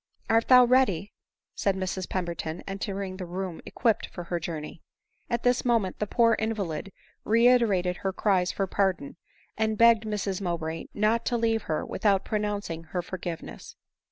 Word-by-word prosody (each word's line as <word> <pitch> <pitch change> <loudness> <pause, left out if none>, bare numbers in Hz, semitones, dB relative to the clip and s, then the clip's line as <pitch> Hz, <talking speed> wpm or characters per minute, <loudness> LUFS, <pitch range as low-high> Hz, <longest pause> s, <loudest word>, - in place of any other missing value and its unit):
" - - -36
Art 225 0 +3
thou 250 -1 +8
ready? 235 -7 +2 0.2
" - - -65
said 200 -2 +1
Mrs 185 -1 -3
Pemberton, 170 -2 -3
entering 195 -1 -4
the 185 - -5
room 180 -1 -5
equipped 225 -3 0
for 175 - -8
her 175 0 -3
journey. 160 -1 -6 0.5
At 235 0 -1
this 245 0 +2
moment 230 -7 +1
the 210 - -1
poor 230 +1 +4
invalid 200 -6 -3 0.3
reiterated 225 -6 +3
her 195 - -2
cries 185 -2 +1
for 195 - -1
pardon, 190 -6 -1 0.4
and 220 -1 +1
begged 230 -1 +5
Mrs 205 -2 -2
Mowbray 165 -3 -3
not 215 +3 +2
to 240 - +1
leave 225 -1 +1
her 155 - -1
with - - -7
out 195 -1 +3
pronouncing 205 -6 -3
her 175 +2 -3
forgiveness. 175 -2 -7
195 Hz, 165 wpm, -27 LUFS, 180-225 Hz, 0.5 s, thou